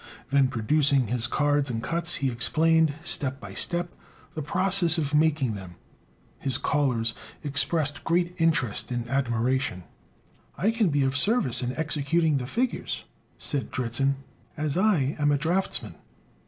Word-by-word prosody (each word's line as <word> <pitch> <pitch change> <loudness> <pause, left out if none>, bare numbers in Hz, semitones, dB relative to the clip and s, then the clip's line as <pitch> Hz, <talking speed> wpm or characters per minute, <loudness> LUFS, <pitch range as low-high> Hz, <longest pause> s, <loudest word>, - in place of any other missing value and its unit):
Then 140 -1 +4
producing 135 +2 +2
his 120 0 0
cards 145 +1 +1
and 115 -2 -3
cuts, 170 0 +1
he 135 -2 -1
explained, 160 +5 +2
step 140 -5 +1
by 100 -5 -9
step, 175 - -1 0.4
the 155 - -4
process 180 +2 +2
of 150 -2 -2
making 150 -5 +2
them. 95 -3 -9 0.6
His 135 -3 0
callers 125 -7 0 0.3
expressed 145 +1 +1
great 175 +1 0
interest 130 -10 +1
and 120 -1 -3
admiration. 125 -5 -1 0.7
"I 210 +5 +2
can 225 -4 +1
be 145 -2 +1
of 135 +1 0
service 145 - +3
in 125 0 -3
executing 155 0 +1
the 125 -2 -4
figures," 245 - -2 0.3
said 135 -6 -2
Dritzhn, 130 +3 0 0.4
"as 150 -2 -2
I 175 -8 +2
am 145 0 +2
a 145 - +2
draughtsman." 175 +6 -1
145 Hz, 140 wpm, -26 LUFS, 125-165 Hz, 0.7 s, Then